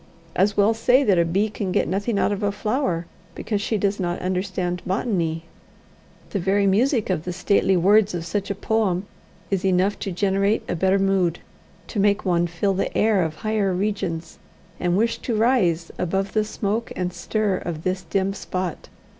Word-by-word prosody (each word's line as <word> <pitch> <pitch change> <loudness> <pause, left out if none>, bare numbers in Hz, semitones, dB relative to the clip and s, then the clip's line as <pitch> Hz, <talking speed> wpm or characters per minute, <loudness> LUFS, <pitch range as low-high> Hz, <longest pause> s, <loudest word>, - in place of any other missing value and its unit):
As 200 +2 +2
well 205 +2 +4
say 250 +4 +3
that 195 -8 +3
a 170 - +4
bee 195 +6 +1
can 205 -3 -4
get - - +1
nothing 200 +3 -1
out - - +2
of 205 0 -2
a 205 -1 +1
flower, 205 -4 -1 0.3
because 210 -2 -2
she 220 +1 0
does 200 0 0
not 175 -1 -1
understand 185 -1 -2
botany. 180 -5 -1 0.9
The 200 - -1
very 195 +3 +2
music 220 +2 +2
of 160 -4 -1
the 180 - -4
stately 190 +1 +2
words 200 +2 +4
of 170 -1 -4
such 200 +3 -2
a 200 - -1
poem 205 -3 0 0.5
is 195 -2 0
enough 190 +1 +2
to 195 - -3
generate 200 +3 +1
a - - -1
better 190 +3 +2
mood, 190 -3 +1 0.5
to 215 - -3
make 200 +1 +2
one 175 -2 +2
feel 175 +4 0
the 190 - -2
air 210 -3 +3
of 160 -2 -2
higher 210 +2 0
regions, 185 -4 -3 0.4
and 175 0 +1
wish 230 +2 +1
to 235 - -2
rise 205 -8 +2
"above 195 +3 -1
the 215 -1 +2
smoke 215 +1 -2
and 180 -1 -2
stir 200 +2 -1
of 165 -3 -5
this 185 0 -1
dim 195 +1 -1
spot". 185 -3 -4
195 Hz, 185 wpm, -23 LUFS, 180-210 Hz, 0.9 s, well